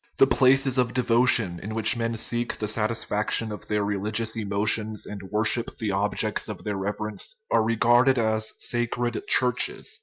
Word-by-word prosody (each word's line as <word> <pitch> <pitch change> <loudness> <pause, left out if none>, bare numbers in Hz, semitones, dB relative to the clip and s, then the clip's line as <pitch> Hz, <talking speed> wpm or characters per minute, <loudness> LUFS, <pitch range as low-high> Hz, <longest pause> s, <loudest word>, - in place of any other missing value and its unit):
The - - +6
places 135 0 +3
of 125 -1 0
devotion, 120 -7 +3
in 110 +2 -6
which 110 +2 +4
men 115 -1 -2
seek 120 +2 -2
the 105 - -3
satisfaction 110 0 -1
of 105 - -8
their 105 -1 -1
religious 105 +3 -1
emotions 105 0 -1
and 105 -1 -8
worship 110 +3 -1
the 110 -3 -2
objects 100 +2 -1
of 105 - -7
their 105 -2 -3
reverence, 105 +1 -4 0.2
are 115 - +3
regarded 120 +3 +3
as 110 -1 0
sacred 120 0 -1
" - - -30
churches." 125 -2 0
110 Hz, 160 wpm, -25 LUFS, 105-120 Hz, 0.2 s, The